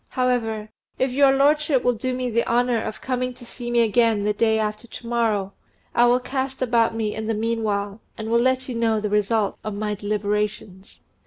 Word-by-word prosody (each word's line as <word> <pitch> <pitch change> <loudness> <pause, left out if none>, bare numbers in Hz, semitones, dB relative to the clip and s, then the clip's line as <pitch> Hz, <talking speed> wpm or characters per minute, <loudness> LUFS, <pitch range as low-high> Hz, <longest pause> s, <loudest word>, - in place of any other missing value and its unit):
However, 230 -4 -1 0.3
if 260 0 0
your 275 +1 +5
lordship 285 0 +3
will 245 - +3
do 255 +3 -3
me 250 -1 -2
the 235 +1 +1
honour 240 -1 +2
of 215 - -6
coming 255 -1 -2
to 240 - -13
see 240 0 -7
me 240 0 +3
again 225 -1 +2
the 210 0 +1
day 220 +1 +2
after 215 +1 -3
to 235 - -10
morrow, 220 -5 0 0.4
I 240 0 +5
will 245 +1 +4
cast 265 +1 -3
about 230 -3 +2
me 220 -2 -1
in 220 0 -5
the 225 - 0
meanwhile, 215 -2 -2 0.2
and 220 0 -5
will 235 0 +4
let 260 +1 +1
you 255 - -4
know 230 -1 +1
then 215 - -2
the 210 - -1
result 210 0 +1
of 215 -1 -4
my 210 0 -2
deliberations." 205 -1 -3
230 Hz, 210 wpm, -23 LUFS, 210-250 Hz, 0.4 s, your